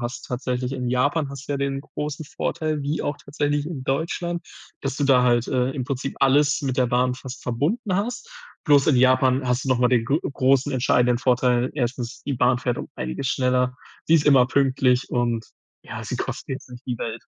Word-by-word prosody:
hast 120 +2 -5
tatsächlich 125 0 -3
in 125 -2 -3
Japan 145 +4 +1
hast 140 0 -9
du - - -1
ja 140 - 0
den 140 0 -2
großen 150 +1 -5
Vorteil, 155 0 -2
wie 145 +3 -2
auch 145 - -2
tatsächlich 145 0 -2
in 155 -5 -5
Deutschland, 170 +5 -2 0.4
dass 135 0 -2
du 145 - 0
da 135 -2 +5
halt, 120 -1 +2
äh, 125 0 +1
im 135 -2 -4
Prinzip 135 +1 -3
alles 140 +2 +4
mit 130 -2 -2
der 125 - +3
Bahn 125 +1 +1
fast 130 +1 -9
verbunden 170 - -1
hast. 240 - -3 0.3
Bloß 145 -2 +5
in 145 - +4
Japan 130 +1 +3
hast 125 +1 0
du - - -4
noch 125 - +3
mal 125 - +3
den 120 -3 +2
gro 140 +6 +1
großen 135 0 +1
entscheidenden 125 -2 +2
Vorteil. 125 0 +2
1. 125 -3 -3
die 140 - -2
Bahn 125 0 +2
fährt 120 0 -1
um - - -6
einiges 65 - -4
schneller. 125 -1 +1 0.3
Sie 165 - +3
ist 150 -3 +3
immer 135 -4 +6
pünktlich 130 -1 +2
und 120 -2 0 0.4
ja, - - -7
sie - - -4
kostet - - -5
jetzt 135 0 -6
nicht 125 +1 -12
die 125 -2 -3
Welt. 115 0 -5
130 Hz, 205 wpm, -23 LUFS, 125-145 Hz, 0.4 s, immer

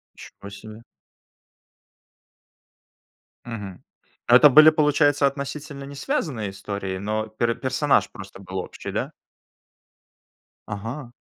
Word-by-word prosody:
Ничего 100 - -12
себе. 110 +2 -11 2.6
Мгм. 105 -6 -8 0.4
Это 125 +5 +8
были, 155 +3 +8
получается, 145 -2 +3
относительно 140 +1 -5
не 140 +1 -9
связанные 140 - -3
истории, 95 -1 -5
но 110 +2 -2
пер 115 +2 -1
персонаж 135 +2 +1
был 120 - -15
просто 100 0 -11
общий, 95 -1 -6
да? - - -3 1.6
Ага. 115 +5 -6
120 Hz, 95 wpm, -23 LUFS, 105-145 Hz, 2.6 s, Это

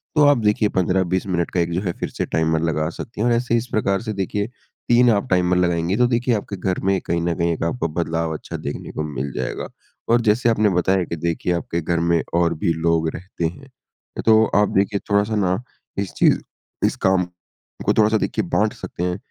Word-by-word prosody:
तो 150 -1 +6
आप 145 -1 +6
देखिए 105 -1 +2
15–20 95 0 +1
मिनट 85 -3 -1
का 90 - 0
एक 85 0 0
जो 90 - 0
है 95 -3 -1
फिर - - -2
से - - -3
टाइमर 80 0 +1
लगा 80 -1 0
सकती 105 +5 -7
हैं। 120 - +2
और 120 - +3
ऐसे 120 0 0
ही - - +5
इस 115 +2 -3
प्रकार 100 -3 +1
से 110 -2 -4
देखिए, 100 +1 -2 0.4
3 120 +1 +6
आप 100 -2 0
टाइमर 90 0 +3
लगाएँगी, 85 0 +1
तो 125 0 +4
देखिए 120 0 +1
आपके 100 -1 -4
घर 90 0 -1
में 95 0 +1
कहीं 85 0 0
ना 85 0 0
कहीं 85 0 +1
एक 80 - -4
आपको 85 +3 -1
बदलाव 80 -1 -1
अच्छा 80 - -6
देखने - - -6
को 75 - -3
मिल 70 +1 -3
जाएगा। 65 0 -3 0.4
और 120 +1 +4
जैसे 115 +2 +2
आपने 110 -2 +3
बताया 95 +1 +2
कि 85 - -4
देखिए 85 +2 -1
आपके 85 0 -2
घर 85 +1 0
में 85 -1 +2
और 85 -1 +3
भी 85 - +1
लोग 80 0 +1
रहते 90 -1 -5
हैं, 110 +12 -5 0.6
तो 110 -1 +6
आप 105 0 +4
देखिए 100 +1 +1
थोड़ा-सा 100 +2 +2
ना 95 0 +1 0.4
इस 100 -2 -2
चीज़ - - +4 0.5
इस - - +1
काम 95 -1 +4 0.6
को - - +3
थोड़ा-सा 110 0 +4
देखिए - - -1
बाँट - - +2
सकते 85 - -6
हैं, 90 0 -1
95 Hz, 220 wpm, -21 LUFS, 85-105 Hz, 0.6 s, तो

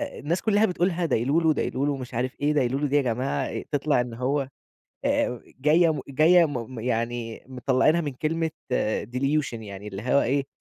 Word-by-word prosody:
الناس 185 - -3
كُلّها 215 0 +3
بتقولها 180 -1 0
دايلولو، 150 +6 +2
دايلولو 140 0 -1
مش 130 -2 -8
عارف 125 +2 -3
إيه 145 +1 +2
دايلولو 140 0 +1
دي 145 +1 +1
يا 145 - +4
جماعة؟ 125 +2 -1
أ - - -4
تطلع 145 -2 +1
إن 120 -1 -4
هو 135 +3 -1 0.6
آآ 120 -2 +1 0.2
جاية 160 +4 +4
م 150 - -4
جاية 160 +6 +5
م 125 -4 -5
يعني 115 -1 -3
مطلّعينها 135 +5 +2
من 145 -4 -3
كلمة 160 +4 -1 0.2
آآ 110 -4 0
Delusion 135 +6 -1
يعني 100 -1 -8
اللي 95 0 -6
هو 130 +4 +3
إيه 135 +2 0
135 Hz, 175 wpm, -25 LUFS, 125-155 Hz, 0.6 s, جاية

